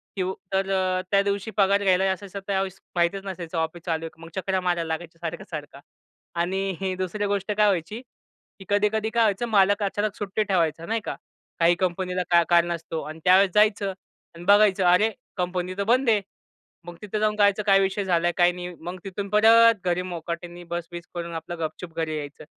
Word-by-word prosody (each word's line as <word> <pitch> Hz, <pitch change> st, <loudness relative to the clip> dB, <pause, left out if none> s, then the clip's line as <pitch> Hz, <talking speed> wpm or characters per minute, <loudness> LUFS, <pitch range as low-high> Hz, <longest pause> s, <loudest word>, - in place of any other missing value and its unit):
की 190 Hz, -, -1 dB, 0.3 s
तर 195 Hz, 0 st, +1 dB
अ, 185 Hz, -1 st, +1 dB
त्या 200 Hz, -1 st, +5 dB
दिवशी 200 Hz, +2 st, -2 dB
पगार 200 Hz, 0 st, +3 dB
घ्यायला 190 Hz, -1 st, +3 dB
असायचं 200 Hz, +1 st, -6 dB
त्यावेळेस 195 Hz, -1 st, -2 dB, 0.2 s
माहितीच 175 Hz, +3 st, +1 dB
नसायचं 175 Hz, -3 st, -5 dB
ऑफिस 160 Hz, +1 st, -2 dB
चालू 165 Hz, -2 st, -1 dB
आहे -, -, -5 dB
का? 160 Hz, +1 st, -23 dB
मग -, -, -11 dB
चकरा 190 Hz, 0 st, -1 dB
मारायला 175 Hz, -2 st, 0 dB
लागायच्या 165 Hz, +1 st, -5 dB
सारखं, 170 Hz, +2 st, -5 dB
सारखं. 150 Hz, -3 st, -7 dB, 0.6 s
आणि 190 Hz, +3 st, 0 dB
ही 190 Hz, -1 st, -1 dB
दुसरी 185 Hz, +3 st, -2 dB
गोष्ट 200 Hz, 0 st, -1 dB
काय 210 Hz, 0 st, +3 dB
व्हायची, 195 Hz, +4 st, -1 dB, 0.6 s
की 195 Hz, -, -11 dB
कधी-कधी 210 Hz, +2 st, +1 dB
काय 230 Hz, +1 st, +2 dB
व्हायचं, 210 Hz, +2 st, +1 dB
मालक 205 Hz, 0 st, +3 dB
अचानक 205 Hz, +1 st, -1 dB
सुट्टी 205 Hz, +1 st, -2 dB
ठेवायचा, 165 Hz, -5 st, 0 dB
नाही 225 Hz, +3 st, -1 dB
का. -, -, -3 dB, 0.4 s
काही 170 Hz, +1 st, +5 dB
कंपनीला 180 Hz, 0 st, -1 dB
काय 170 Hz, -1 st, +5 dB
कारण 175 Hz, 0 st, +4 dB
असतो 165 Hz, -1 st, -4 dB
आणि 155 Hz, +1 st, -8 dB
त्यावेळेस 190 Hz, +1 st, +6 dB
जायचं 210 Hz, -2 st, +3 dB, 0.4 s
आणि 170 Hz, -, -10 dB
बघायचं 200 Hz, -1 st, +5 dB
अरे! 205 Hz, +5 st, +4 dB, 0.3 s
कंपनी 180 Hz, 0 st, -2 dB
तर 200 Hz, -, 0 dB
बंद 245 Hz, +4 st, +2 dB
आहे. 215 Hz, -2 st, +3 dB, 0.6 s
मग 175 Hz, 0 st, -9 dB
तिथे 210 Hz, 0 st, -3 dB
जाऊन 210 Hz, 0 st, +1 dB
करायचं 205 Hz, 0 st, +3 dB
काय 195 Hz, -1 st, +5 dB
विषय 195 Hz, +1 st, 0 dB
झालाय, 175 Hz, -2 st, +2 dB
काय 175 Hz, 0 st, +5 dB
नाही? 180 Hz, 0 st, -7 dB
मग 175 Hz, +3 st, -6 dB
तिथून 195 Hz, +1 st, -5 dB
परत 225 Hz, +2 st, +6 dB
घरी 175 Hz, 0 st, +1 dB
मोकाटनी 175 Hz, 0 st, -6 dB
बस-बिस 175 Hz, 0 st, -5 dB
करून 170 Hz, -1 st, -5 dB
आपलं 165 Hz, +2 st, -6 dB
गपचूप 165 Hz, +1 st, -5 dB
घरी 160 Hz, -1 st, -1 dB
यायचं. 145 Hz, -1 st, -7 dB
185 Hz, 190 wpm, -25 LUFS, 170-200 Hz, 0.6 s, त्यावेळेस